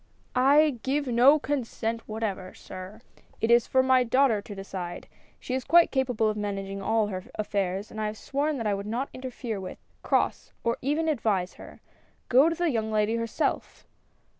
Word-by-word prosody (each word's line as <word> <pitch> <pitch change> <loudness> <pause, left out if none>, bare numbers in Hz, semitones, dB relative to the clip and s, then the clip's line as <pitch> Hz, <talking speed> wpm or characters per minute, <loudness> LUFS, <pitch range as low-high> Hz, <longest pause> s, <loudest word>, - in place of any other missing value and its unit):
"I 275 +1 +4
give 280 +3 0
no 255 +4 +6
consent 230 -5 -2
w^hatever, 215 -4 -4
sir; 185 +4 -10 0.4
it 225 - +1
is 235 -1 +5
for 260 0 +3
my 260 -1 +4
daughter 245 -3 +3
to 205 0 -9
decide. 190 -2 -6 0.3
She 255 - -5
is 260 0 -1
quite 340 +4 +5
capable 250 -5 +1
of 215 - 0
managing 195 -1 -4
all 220 +2 +2
her 185 -2 -5
affairs, 200 -1 -2
and 220 - -5
I 215 - 0
have 210 +1 -5
sworn 290 +4 -1
that 230 - -4
I 210 - +2
would 200 +1 -4
not 245 +6 -2
inter 260 0 -6
fere 235 -4 -5
with, 185 - -7 0.2
— - - -38
cross, - - 0
— - - -41
or 235 - 0
even 300 +4 0
advise 215 - 0
her. - - -13 0.5
Go 265 +6 +6
to 335 - -2
the 345 -1 0
young 220 -3 -1
lady 215 +1 +1
herself 230 -1 -2
230 Hz, 190 wpm, -27 LUFS, 205-265 Hz, 0.5 s, no